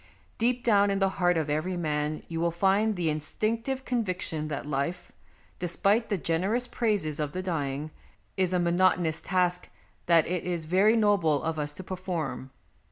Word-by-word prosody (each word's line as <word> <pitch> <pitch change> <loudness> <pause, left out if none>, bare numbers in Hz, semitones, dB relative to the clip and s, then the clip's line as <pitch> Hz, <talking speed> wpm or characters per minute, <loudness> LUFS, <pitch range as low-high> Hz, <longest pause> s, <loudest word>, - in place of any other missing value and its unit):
Deep 245 +1 +1
down 205 -3 +4
in 195 - +1
the 195 0 +2
heart 175 -1 +3
of 160 -2 0
every 155 +5 -1
man 150 -2 -2
you 165 -1 -4
will 170 - +2
find 195 +5 +2
the 175 -3 -1
instinctive 225 - -2
conviction 185 -9 -2
that 145 -2 -4
life, 150 +5 -3 0.5
despite 200 +6 +1
the 200 - +1
generous 190 +9 0
praises 205 - -1
of 150 -1 -2
the 185 +1 -3
dying, 150 -4 -2 0.4
is 185 -2 +1
a 185 - +2
monotonous 175 -2 +2
task 180 -1 0 0.4
that 170 -2 +5
it 180 -1 -2
is 175 -3 -3
very 195 +7 +4
noble 195 -9 +3
of 160 -1 -2
us 145 0 -2
to 185 - -8
perform. 180 -7 -4
180 Hz, 165 wpm, -28 LUFS, 155-200 Hz, 0.5 s, that